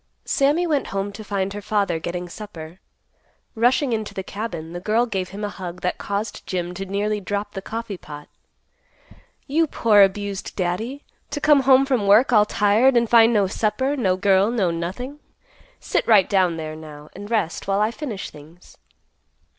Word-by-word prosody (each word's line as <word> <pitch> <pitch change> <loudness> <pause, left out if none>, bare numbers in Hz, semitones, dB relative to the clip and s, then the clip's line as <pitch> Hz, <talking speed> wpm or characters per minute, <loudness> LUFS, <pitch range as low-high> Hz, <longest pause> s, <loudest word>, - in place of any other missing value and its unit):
Sammy 295 +5 +2
went 300 -5 0
home 195 +1 -3
to 215 +2 -8
find 195 -1 -2
her 205 - -6
father 200 -5 0
getting 175 +2 -4
supper. 175 -3 -10 0.7
Rushing 245 +3 +2
into 215 -1 -3
the 190 - -4
cabin, 180 -6 -6
the 175 - -4
girl 215 +6 +1
gave 190 -5 -3
him 200 +2 -7
a 205 - -1
hug 180 -3 -8
that 180 - -2
caused 205 +1 -4
Jim 175 -1 -3
to 195 +2 -6
nearly 205 +2 -1
drop 205 +2 -3
the 195 - -5
coffee 220 -2 -6
pot. 150 -1 -10 1.2
"You 320 +3 +1
poor 215 -7 +4
abused 200 0 0
Daddy, 215 +10 -3 0.3
to 290 - -3
come 295 -1 +5
home 265 0 +5
from 250 -7 0
work, 225 +6 +5
all 210 -1 +5
tired 220 +6 +3
and 235 0 +2
find 230 0 +6
no 210 -4 +3
supper, 230 +8 -1
no 190 -9 +1
girl, 195 +1 +3
no 205 -7 +1
nothing. 195 +13 -5 0.6
Sit - - -1
right 210 -5 +6
down 185 -4 +2
there, 155 -1 -5
now, 150 -1 -11
and 205 +2 -9
rest, 215 -8 -1
while 195 0 +1
I 215 +2 +2
finish 235 - -6
things." 155 +4 -16
205 Hz, 180 wpm, -22 LUFS, 185-230 Hz, 1.2 s, find